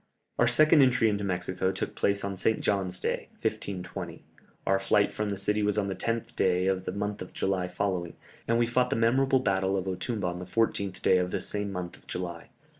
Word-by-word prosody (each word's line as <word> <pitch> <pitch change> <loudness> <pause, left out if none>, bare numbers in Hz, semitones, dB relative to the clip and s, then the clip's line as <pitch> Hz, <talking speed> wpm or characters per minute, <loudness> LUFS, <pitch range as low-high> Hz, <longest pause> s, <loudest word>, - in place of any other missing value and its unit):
Our - - +5
second 155 0 +6
entry 125 -4 +4
into 105 -1 -1
Mexico 95 0 -1
took 95 - -4
place 100 0 +1
on 100 -1 -3
St. 110 +4 +1
John's 95 -3 -1
Day, - - -2
1520; 95 -3 -4 0.4
our 95 0 +3
flight 100 +1 +2
from 105 0 -2
the 100 - -2
city 105 +2 +1
was 105 0 +1
on 100 -1 +1
the 95 - -2
10th 115 +4 -3
day 90 0 +2
of 95 -1 0
the - - -2
month 105 0 -3
of 90 - -8
July 95 -2 0
following, 90 -2 -2 0.3
and 115 - +3
we 120 - +3
fought 125 +1 +1
the 135 - 0
memorable 130 +3 +3
battle 95 -2 +1
of 95 - -2
Otumba 95 +3 -2
on 90 0 -2
the 90 - -6
14th 100 -1 -1
day 95 - +5
of 90 0 0
this - - -2
same 105 -1 -2
month 90 -2 -5
of - - -25
July. 85 -2 -5
100 Hz, 215 wpm, -28 LUFS, 90-105 Hz, 0.4 s, second